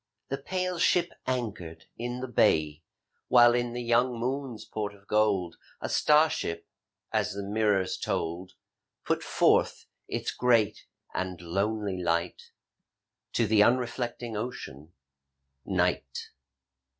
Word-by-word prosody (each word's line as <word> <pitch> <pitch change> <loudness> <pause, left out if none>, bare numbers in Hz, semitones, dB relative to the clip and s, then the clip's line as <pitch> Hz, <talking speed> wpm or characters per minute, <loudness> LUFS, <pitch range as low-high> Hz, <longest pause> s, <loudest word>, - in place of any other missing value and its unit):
The 135 - -2
pale 180 +3 -2
ship 175 0 +3 0.2
anchored 110 -10 -3
in 120 +1 -4
the 130 - -3
bay, 75 - +2 0.5
While 120 -1 +7
in 120 0 0
the 120 0 -4
young 120 +1 +2
moon's 130 -1 -3
port 105 -1 -4
of 100 0 -22
gold 105 -5 +1 0.2
A - - -4
star 150 +1 +5
ship 85 - -4 0.3
— - - -56
as - - +1
the 100 0 -5
mirrors 100 -2 +1
told 85 +3 -3 0.3
— - - -55
Put - - 0
forth - - +2 0.2
its - - -2
great 115 -4 +2 0.3
and 95 -1 -3
lonely 100 +2 -2
light 85 0 -1 0.8
To 115 - +2
the 105 0 +4
unreflecting 120 0 0
Ocean, 105 - -6 0.7
Night. - - -1
110 Hz, 125 wpm, -28 LUFS, 95-125 Hz, 0.8 s, While